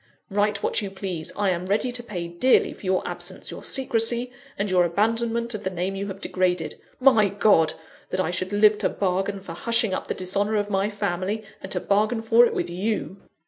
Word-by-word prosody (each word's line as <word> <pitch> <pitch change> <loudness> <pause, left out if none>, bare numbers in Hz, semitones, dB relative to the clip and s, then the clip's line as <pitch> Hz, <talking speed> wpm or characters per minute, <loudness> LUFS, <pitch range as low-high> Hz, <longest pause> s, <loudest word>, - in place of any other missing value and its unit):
Write 205 0 +1
what - - +1
you 200 - -4
please; 190 -4 -4
I 205 -2 +1
am 180 +1 -3
ready 215 +6 +1
to 245 0 -3
pay 180 -7 -5
dearly 175 +10 +3
for - - -17
your 185 0 +1
absence, - - -5
your - - -8
secrecy, 240 -1 +1 0.3
and 200 - -1
your 185 -2 +4
abandonment 230 +6 0
of 210 -1 -5
the 190 - -1
name 185 +1 -3
you 200 +1 -3
have 195 -1 -6
degraded. 180 -4 0 0.3
My 240 -6 +5
God! 190 -5 +3 0.3
that 185 - -2
I 180 -2 +1
should 185 +1 -2
live 210 +1 +4
to - - +1
bargain 195 +1 -1
for 185 - -8
hushing 230 +3 +1
up - - -3
the - - -2
dishonour 200 +4 0
of 205 0 -1
my 195 +1 +1
family, 205 +1 -2 0.2
and 190 - -8
to - - -1
bargain 215 +3 +1
for 230 +2 +6
it - - -4
with - - -1
_you. 195 +2 -2
200 Hz, 210 wpm, -24 LUFS, 185-220 Hz, 0.3 s, for